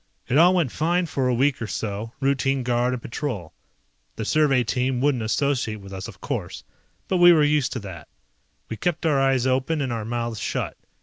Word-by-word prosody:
It 125 - 0
all 175 +4 +6
went 165 -9 +1
fine 175 +3 +1
for 135 -5 -1
a 125 - +2
week 135 +1 +1
or 115 - -2
so, 105 +2 -4
routine 135 -1 +1
guard 120 +1 +1
and 125 - -4
patrol. 115 - -5 0.6
The 110 - -4
survey 140 -2 +3
team 125 +2 -1
wouldn't 135 -2 +1
associate 115 0 0
with 100 0 -11
us, 95 0 -6
of - - -12
course, - - -5 0.4
but 185 - +1
we 175 0 +8
were 160 -3 +5
used 145 -2 +2
to 130 - -3
that. 95 -4 -9 0.6
We 110 - -6
kept 170 - -2
our 145 -4 +3
eyes 135 -2 +2
open 130 +5 +1
and 130 -4 -1
our 115 -2 -3
mouths 115 -1 -3
shut. - - -3
130 Hz, 200 wpm, -24 LUFS, 115-145 Hz, 0.6 s, we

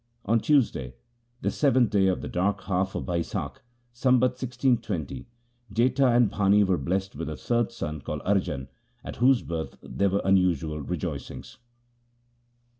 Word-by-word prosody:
On 115 +3 +3
Tuesday, 110 - +1 0.5
the - - 0
seventh 130 -5 +3
day 100 -2 +3
of 95 - 0
the - - -5
dark 95 +3 0
half 95 0 -1
of - - -3
Bai 85 -2 0
sakh, - - -5 0.3
Sambat 125 +1 +3
1620, 115 - -1 0.4
Jetha 125 +3 +3
and 120 -3 +4
Bhani 100 0 +4
were 95 -2 +1
blessed 95 +6 -2
with 80 +2 -4
a 75 - -5
third 120 -1 0
son 75 -10 -5
called 75 +2 -5
Arjan, 90 -9 0 0.4
at - - -7
whose 125 +1 +4
birth 80 -1 -5
there 100 0 0
were 100 +2 0
unusual 90 -5 +2
rejoicings. 70 - -6
100 Hz, 150 wpm, -26 LUFS, 85-120 Hz, 0.5 s, and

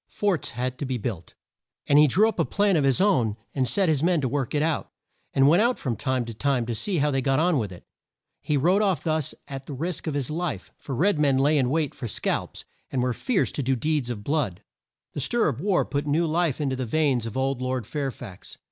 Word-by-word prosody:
Forts 200 -8 -1
had 125 +1 -3
to 145 - -2
be 130 -1 -2
built, 105 -7 -5 0.5
and 145 0 +5
he 150 - +7
drew 200 - +4
up 225 - -3
a - - +4
plan 205 -2 +2
of 150 - +2
his 135 +3 +2
own 125 - +2 0.2
and 130 -2 0
set 160 - +2
men 175 0 +3
to 130 - 0
work 135 0 -2
it 145 - +2
out, 160 -1 -1 0.4
and 135 0 +4
went 170 +7 +5
out 240 +2 +2
from 125 -4 -2
time 130 -1 -1
to 115 - -6
time 130 +1 0
to 120 - -3
see 180 - -2
how 150 0 +2
they 135 -1 0
got 135 0 +1
on 165 -1 +3
with 105 -5 -3
it. 90 - -11 0.6
He 150 - 0
rode 180 +9 +3
off 195 -5 +1
thus 155 -3 -1
at 135 -1 -7
the 145 - -6
risk 165 +4 -4
of 150 - -2
his 140 -1 -2
life, 155 - -3
for 135 - -5
red 170 +4 +2
men 140 -3 +3
lay 145 +3 +3
in 130 -4 +2
wait 150 -1 0
for 120 - -6
scalps, 105 - -3 0.2
and 130 -2 -1
were 125 -1 +1
fierce 230 - 0
to - - -3
do 135 0 +1
deeds 150 -1 -1
of 110 -4 -5
blood. 140 - -1 0.5
The 145 - -3
stir 235 - +2
of 125 - -2
war 195 -1 +2
put 145 +1 -3
new 155 +4 +2
life 165 -2 0
in 145 -3 -1
to - - -1
the 130 -2 -3
veins 135 -4 +1
of 115 - -6
old 135 -1 0
Lord 130 -2 -2
Fair 140 +3 -2
fax. 95 -7 -11
140 Hz, 250 wpm, -25 LUFS, 130-160 Hz, 0.6 s, he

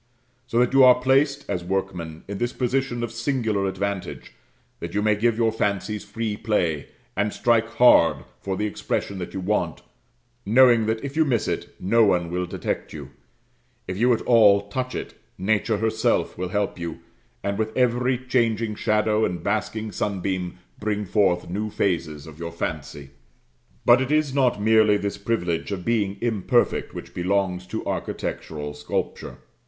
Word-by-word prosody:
So 115 - -2
that 125 +1 +3
you 135 -1 +7
are 125 -1 +7
placed, 140 +2 +2
as 90 - -2
workmen, 90 -4 -3
in 100 0 -5
this 120 0 -1
position 125 -1 -1
of 120 - -3
singular 115 -5 -1
advantage, 100 0 -4 0.5
that - - -6
you 105 - +2
may 105 0 +4
give 115 +2 +1
your 115 -1 +2
fancies 105 -1 -2
free 110 -2 -3
play, 90 -10 -1 0.3
and 105 +2 0
strike 115 0 +2
hard 125 -9 +5 0.2
for 95 -1 -3
the 105 - -1
expression 100 -1 -3
that 90 - -6
you - - -2
want, 90 -3 -1 0.6
knowing 120 0 +5
that, 110 0 -1
if 140 +1 -6
you 160 - +4
miss 125 -7 0
it, - - -4
no 115 +5 +3
one 90 -5 +2
will 90 0 -2
detect - - -4
you; - - -8 0.8
if 90 - -3
you 120 +6 +3
at 115 - +1
all 100 -4 +5
touch 130 +4 -3
it, - - -5 0.2
nature 110 +3 +1
herself 110 +1 0
will 90 0 -4
help 100 -1 -1
you, 85 -1 -5 0.4
and 100 +1 -2
with 110 0 0
every 125 0 +2
changing 115 -3 0
shadow 105 +1 +1
and 90 -4 -2
basking 110 +1 -2
sunbeam 95 -2 -2 0.2
bring 105 -1 -2
forth 95 -2 +1
new 105 +5 -3
phases 80 -8 -1
of 80 -1 -12
your 85 0 -5
fancy. 75 -4 -5 0.7
But 120 +2 +6
it 130 +2 -2
is 155 -3 +2
not 130 -6 +2
merely 110 -1 +4
this 100 0 -4
privilege 100 -5 -1
of 90 -3 -4
being 105 -4 0
imperfect 115 -5 +1
which - - -8
belongs 90 0 -1
to - - -5
architectural 75 -1 -4
sculpture. 75 0 -4
105 Hz, 165 wpm, -24 LUFS, 95-115 Hz, 0.8 s, you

